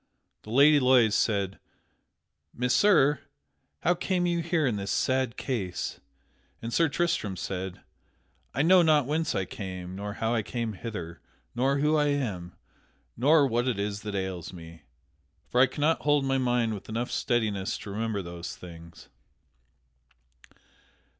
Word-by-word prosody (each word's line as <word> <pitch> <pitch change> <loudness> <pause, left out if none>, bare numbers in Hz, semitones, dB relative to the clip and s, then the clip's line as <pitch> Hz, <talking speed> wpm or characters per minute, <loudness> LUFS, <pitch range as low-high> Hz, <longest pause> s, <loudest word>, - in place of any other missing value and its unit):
The - - -13
Lady 145 +5 +6
Loise 125 -5 +4
said, 100 -4 0 1.0
"Messire, 135 - +4 0.6
how 175 - +3
came 180 0 -1
you 170 -1 +1
here 165 -2 0
in 120 -5 +1
this 100 -1 -4
sad 130 -2 0
case?" 100 -9 -3 0.6
And 115 0 -6
Sir 165 -2 +3
Tristram 145 - -1
said: 95 +1 -5 0.7
"I 135 - 0
know 180 +2 +6
not 155 -4 +4
whence 155 +4 -1
I 95 - 0
came, 90 -1 -7
nor 100 +1 -5
how 110 +2 -1
I 115 - +1
came 115 +1 -3
hither, 90 -6 -7 0.3
nor 135 +3 +1
who 150 +2 +2
I 150 -1 +2
am, 105 - -2 0.6
nor 145 +5 +4
what 120 -1 0
it 125 -5 0
is 100 0 -3
that 105 -1 -5
ails 95 -3 -4
me, 85 -2 -11 0.7
for 125 - +4
I 135 - +6
cannot 150 +5 0
hold 145 -2 +2
my 135 0 +1
mind 120 -3 +1
with 100 0 -8
enough 115 +2 -3
steadiness 105 -6 -1
to 100 - -8
remember 105 -1 -2
those 85 0 -7
things." 85 -1 -12
115 Hz, 145 wpm, -28 LUFS, 100-145 Hz, 1.0 s, Lady